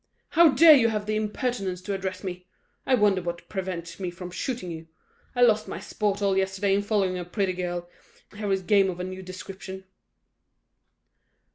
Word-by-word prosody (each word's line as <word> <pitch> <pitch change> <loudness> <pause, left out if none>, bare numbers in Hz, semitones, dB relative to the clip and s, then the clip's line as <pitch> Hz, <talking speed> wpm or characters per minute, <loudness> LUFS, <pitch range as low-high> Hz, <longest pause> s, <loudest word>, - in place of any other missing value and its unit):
"How 335 -1 +6
dare 310 +4 +8
you 250 -6 +5
have 210 -2 -2
the 215 0 -1
impertinence 210 -3 -2
to 200 - -3
address 190 -1 -4
me? 180 -1 -6 0.4
I 260 - +5
wonder 205 -5 +3
what 175 0 -5
prevents 180 -3 -5
me 185 -2 -2
from 180 +1 -8
shooting 190 -1 -4
you. 165 0 -8 0.5
I 245 - +4
lost 220 -3 +4
my - - -5
sport 205 -1 -2
all 195 -1 +2
yesterday 190 +1 +1
in 200 - +2
following 200 -3 0
a - - -3
pretty 185 +1 -1
girl, 175 -1 -4 0.5
here 205 -1 -3
is 190 -1 0
game 195 0 +4
of 180 -1 -5
a - - -2
new 185 +1 -6
description." 190 +1 -8
190 Hz, 180 wpm, -26 LUFS, 185-210 Hz, 0.5 s, dare